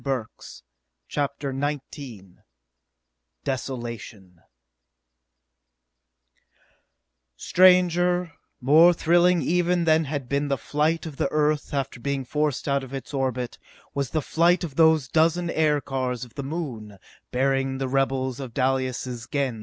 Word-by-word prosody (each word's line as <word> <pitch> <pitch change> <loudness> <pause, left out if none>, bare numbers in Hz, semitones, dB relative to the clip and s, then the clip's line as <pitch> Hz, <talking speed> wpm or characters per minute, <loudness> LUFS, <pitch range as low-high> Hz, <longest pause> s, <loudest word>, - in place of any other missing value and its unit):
Burks_ 130 - -5 0.5
CHAPTER 140 -1 -2
XIX 135 - -5 1.1
Desolation 115 -9 -6 3.0
Stranger, 180 -1 +4 0.3
more 160 +7 +6
thrilling 175 +1 +3
even 175 +1 +1
than 160 0 +3
had 140 -3 -4
been 140 +2 0
the 140 -1 0
flight 155 +5 0
of 155 -4 -8
the - - 0
Earth 150 -1 +1
after 135 -3 -3
being 135 +2 -2
forced 150 +1 -1
out 140 -1 +1
of 135 +1 -7
its 135 - -8
orbit, 130 -3 -2 0.3
was 140 -3 -2
the 155 -2 -1
flight 175 +5 +2
of 160 -5 -5
those 160 -4 +4
dozen 165 +4 +2
aircars 135 -5 0
of 120 - -18
the 140 - -5
Moon, 135 - -5 0.3
bearing 135 +1 0
the 135 0 -2
rebels 130 -1 0
of 130 -4 -7
Dalis' 130 -1 0
Gens 120 -2 -7
back - - -48
to 145 - -2
Earth. 135 -4 0
140 Hz, 130 wpm, -25 LUFS, 130-160 Hz, 3.0 s, more